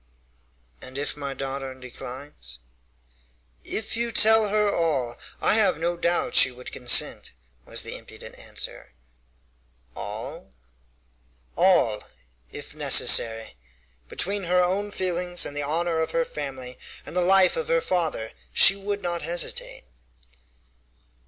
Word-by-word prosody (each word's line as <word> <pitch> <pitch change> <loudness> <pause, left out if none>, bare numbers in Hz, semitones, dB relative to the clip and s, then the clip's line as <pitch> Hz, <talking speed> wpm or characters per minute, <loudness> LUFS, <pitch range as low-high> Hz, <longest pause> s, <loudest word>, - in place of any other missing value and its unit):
"And 130 +1 -10
if 145 +1 -3
my 140 -2 -5
daughter 135 -1 -5
declines?" 125 - -10 1.1
"If 220 - -4
you 235 0 -1
tell 220 -1 +6
her 210 0 +2
all, 135 -8 0 0.2
I - - +3
have 200 -7 +3
no 170 +2 -1
doubt 170 0 0
she - - +7
would 125 0 -11
consent," 125 - +2 0.3
was - - -1
the - - -6
impudent - - -12
answer. - - -7 1.0
"All?" - - -7 1.0
"All, 135 - +3 0.5
if - - -8
necessary. 115 - +3 0.5
Between 200 0 0
her 180 +1 +3
own 195 +3 0
feelings 180 -2 +1
and 145 - -3
the 145 - -1
honor 165 +3 0
of 160 - 0
her 165 0 +1
family 130 -5 -7 0.3
and - - -9
the 180 - +2
life 190 +1 +4
of 480 -2 -3
her - - +3
father 165 - -2 0.2
she 195 - +6
would 200 +1 -4
not 175 -1 -2
hesitate." 170 0 -2
170 Hz, 125 wpm, -25 LUFS, 135-190 Hz, 1.1 s, she